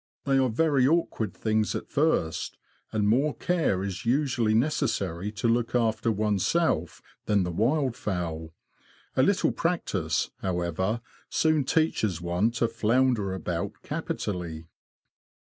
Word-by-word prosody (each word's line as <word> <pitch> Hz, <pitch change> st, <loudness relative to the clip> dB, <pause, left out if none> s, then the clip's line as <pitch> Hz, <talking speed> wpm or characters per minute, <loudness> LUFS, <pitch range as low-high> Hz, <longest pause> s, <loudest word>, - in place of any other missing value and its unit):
They 135 Hz, -1 st, +3 dB
are 130 Hz, -1 st, +3 dB
very 135 Hz, +1 st, +3 dB
awkward 145 Hz, -, +1 dB
things 110 Hz, +1 st, 0 dB
at -, -, -6 dB
first, 140 Hz, -, 0 dB, 0.3 s
and 105 Hz, -2 st, +1 dB
more 135 Hz, +8 st, +2 dB
care 165 Hz, -, 0 dB
is 95 Hz, -2 st, -4 dB
usually 120 Hz, -3 st, +1 dB
necessary 100 Hz, -, 0 dB
to 105 Hz, +3 st, -1 dB
look 115 Hz, +1 st, +1 dB
after 115 Hz, -1 st, +2 dB
one's 105 Hz, -2 st, 0 dB
self 160 Hz, -, 0 dB, 0.2 s
than 105 Hz, -2 st, +3 dB
the 90 Hz, -, -2 dB
wildfowl; 100 Hz, -, -1 dB, 0.7 s
a -, -, +4 dB
little -, -, +3 dB
practice, -, -, -1 dB
however, 95 Hz, +4 st, -1 dB, 0.3 s
soon 155 Hz, -3 st, +2 dB
teaches 110 Hz, -, +1 dB
one 90 Hz, +5 st, +1 dB
to 120 Hz, 0 st, +1 dB
flounder 115 Hz, -3 st, +1 dB
about 90 Hz, -2 st, -3 dB
capitally. 85 Hz, -5 st, -4 dB
110 Hz, 125 wpm, -27 LUFS, 95-130 Hz, 0.7 s, a